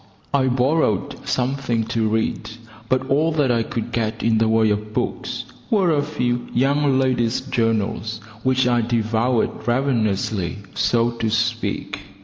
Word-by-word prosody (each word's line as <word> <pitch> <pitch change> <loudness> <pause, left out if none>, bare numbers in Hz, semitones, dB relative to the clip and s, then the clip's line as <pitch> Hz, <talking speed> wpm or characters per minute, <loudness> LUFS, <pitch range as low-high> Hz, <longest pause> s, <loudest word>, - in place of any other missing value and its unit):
I 135 -2 +3
borrowed 130 - 0
something 125 -2 0
to 115 -2 +1
read, 110 +1 -1 0.4
but 130 0 +1
all 150 +4 +2
that 145 -5 +2
I 115 -1 +2
could 115 +1 -4
get 110 -1 -2
in 110 -1 +3
the 115 - +3
way 110 -1 +3
of 105 +1 -3
books - - -2 0.3
were 195 -6 +3
a 145 -2 +2
few 125 -5 -2
Young 140 +2 +3
Ladies' 125 -3 +1
Journals, 110 -1 -1 0.2
which 130 +1 +2
I 120 -1 +3
devoured 115 +1 +1 0.2
ravenously, 110 -7 0 0.2
so 120 0 +2
to 115 -1 -2
speak. 115 +1 -1
120 Hz, 140 wpm, -21 LUFS, 110-130 Hz, 0.4 s, I